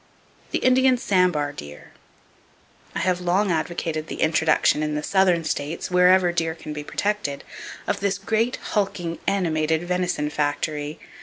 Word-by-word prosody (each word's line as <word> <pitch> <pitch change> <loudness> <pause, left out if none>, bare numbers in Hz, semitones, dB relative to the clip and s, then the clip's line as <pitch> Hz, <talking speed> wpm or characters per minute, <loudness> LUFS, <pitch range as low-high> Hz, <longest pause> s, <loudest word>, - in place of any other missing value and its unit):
The - - 0
Indian 255 0 +4
Sambar 180 - +1
Deer.—I 75 - -13
have 180 -1 +1
long 185 +3 +1
advocated 160 -1 -2
the - - -6
introduction 160 -1 +3
in 150 0 -1
the 150 - -2
southern 185 -3 +3
states, 155 +3 -3
wherever 180 0 +5
deer 165 -2 -1
can 155 -2 -7
be 150 0 -5
protected, 200 -5 -2 0.4
of - - -1
this 200 -1 0
great, 225 +4 0 0.2
hulking, 195 -5 -1
animated 160 -4 +1
venison 180 -4 -1
factory. 150 0 -2
175 Hz, 135 wpm, -23 LUFS, 155-190 Hz, 0.4 s, wherever